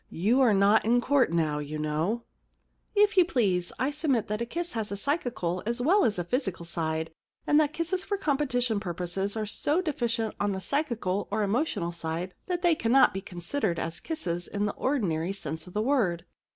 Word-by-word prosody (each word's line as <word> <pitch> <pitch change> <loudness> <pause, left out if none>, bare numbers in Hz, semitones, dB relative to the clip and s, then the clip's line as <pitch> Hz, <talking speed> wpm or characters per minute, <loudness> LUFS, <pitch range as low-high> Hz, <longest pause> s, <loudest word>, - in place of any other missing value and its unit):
You 220 +10 +2
are 250 -4 +5
not 200 +3 +5
in 235 +3 +3
court 260 - +2
now, 155 -3 +1
you 150 +1 -5
know/ 155 +10 -1 0.4
* - - -44
If 410 - -8
you 365 - +8
please, 200 - +1
I 265 +3 0
submit 285 -8 0
that 210 +2 -2
a 235 - -2
kiss 345 +6 -3
has 220 -3 -3
a 200 - -3
psychical 235 - -1
as 235 +1 0
well 350 +11 +4
as 215 -4 +1
a 175 - -1
physical 190 - -2
side, 160 -1 -2 0.3
and 295 - +4
that 300 -1 +2
kisses 340 +4 -1
for 405 0 -2
competition 260 - 0
purposes 185 +2 -3
are 215 - -1
so 290 - 0
deficient 235 - -1
on 205 -1 +1
the 190 - -3
psychical 225 -7 -1
or 210 +1 0
emotional 205 - 0
side 170 +2 -4
that 355 -1 -2
they 345 -1 +5
cannot 265 -2 +4
be 195 - -3
considered 175 +2 -2
as 165 0 -3
kisses 175 - -3
in 205 0 -2
the 205 - -1
ordinary 190 - 0
sense 160 -4 -5
of 180 - -11
the 210 - +1
word. 205 -11 +1
215 Hz, 200 wpm, -28 LUFS, 175-275 Hz, 0.4 s, you